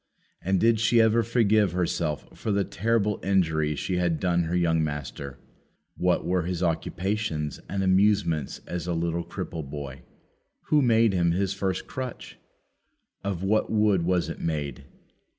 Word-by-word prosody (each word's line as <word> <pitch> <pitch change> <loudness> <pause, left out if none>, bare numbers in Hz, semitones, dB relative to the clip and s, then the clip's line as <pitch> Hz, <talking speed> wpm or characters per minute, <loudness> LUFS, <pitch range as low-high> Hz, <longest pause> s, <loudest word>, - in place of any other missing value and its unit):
And 95 +1 +1
did 115 +1 +3
she 115 +1 +4
ever 115 +1 +4
forgive 110 -5 +2
herself 85 -4 -2
for 110 - -3
the 100 0 +2
terrible 105 +1 0
injury 80 -6 +1
she 90 +4 -2
had 85 -3 +1
done 85 -2 +1
her 85 +2 -2
young 80 -2 +2
master? 70 -2 -5 0.6
What 90 0 +1
were 90 +1 +1
his 90 +1 -3
occupations 85 -2 -2
and 95 0 -1
amusements 95 -6 +2
as 90 0 -4
a 90 - 0
little 85 +1 -1
cripple 80 -4 -6
boy? 70 -2 -7 0.7
Who 150 -1 +5
made 115 -4 +4
him 85 -2 +2
his 95 +1 0
first 95 -1 -2
crutch? 130 -2 -7 0.8
Of 95 -2 -3
what 110 +3 +1
wood 105 -4 +3
was 90 0 +1
it - - -6
made? 75 -3 -3
90 Hz, 150 wpm, -26 LUFS, 80-105 Hz, 0.8 s, Who